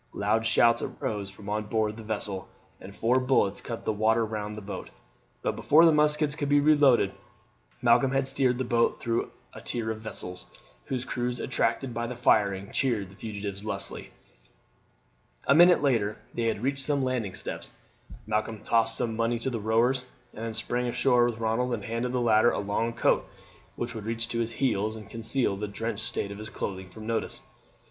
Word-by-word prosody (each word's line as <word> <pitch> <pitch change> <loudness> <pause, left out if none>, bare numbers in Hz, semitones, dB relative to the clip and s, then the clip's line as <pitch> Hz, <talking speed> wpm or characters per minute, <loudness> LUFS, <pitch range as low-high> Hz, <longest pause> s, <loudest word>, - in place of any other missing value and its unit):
Loud 110 +3 +1
shouts 115 +1 +4
arose 100 -2 -4
from 100 +1 -13
on 105 +1 -1
board 110 0 0
the 115 - -9
vessel, 105 -3 -3 0.3
and 100 +1 -11
four 125 +3 +2
bullets 125 -6 +1
cut 115 -2 -6
the 110 - +1
water 110 +2 +2
round 105 -1 -4
the - - -6
boat; 100 0 -7 0.5
but - - 0
before 160 +3 +5
the 165 - +7
muskets 150 -1 +2
could 145 -2 -3
be 145 0 +5
reloaded 145 -8 +5 0.7
Malcolm 120 +2 +5
had 135 0 +1
steered 130 -2 +2
the 130 - -1
boat 120 -1 +1
through 115 0 -1 0.2
a - - -10
tier 115 -2 -2
of 110 0 -6
vessels, 90 -4 -6 0.4
whose 130 -1 -3
crews, 125 -1 -2
attracted 130 -3 0
by 115 +1 -2
the 125 - -5
firing, 100 -4 +2
cheered 110 -8 0
the - - -15
fugitives 100 -2 -6
lustily. 100 -2 -4 1.4
A - - +5
minute 175 +1 +6
later 115 -7 +1 0.2
they 120 - -1
had 115 -1 -1
reached 135 +1 0
some 140 -1 +1
landing 120 -7 -2
steps. - - -6 0.5
Malcolm 110 0 -2
tossed 115 0 +3
some 115 -2 -1
money 115 +1 +1
to 125 +3 -3
the 115 - -2
rowers, 115 +4 +2 0.3
and 110 - -7
then 115 -1 -3
sprang 120 +3 -1
ashore 120 0 +3
with 120 -2 -1
Ronald, 115 +2 0
and 105 - -8
handed 115 +2 -2
the 125 -1 0
latter 110 0 +5
a - - -1
long 105 +3 -1
coat 120 - +1 0.5
which 120 0 -4
would 110 -3 -7
reach 115 +1 -1
to 115 - -2
his 115 0 -2
heels 110 -4 0
and 105 -2 -10
conceal 115 0 0
the 105 +1 -3
drenched 100 - -3
state 100 - -1
of 100 - -7
his 110 0 -7
clothing 95 -1 -5
from 110 +4 -11
notice. 115 0 -2
115 Hz, 190 wpm, -28 LUFS, 105-125 Hz, 1.4 s, the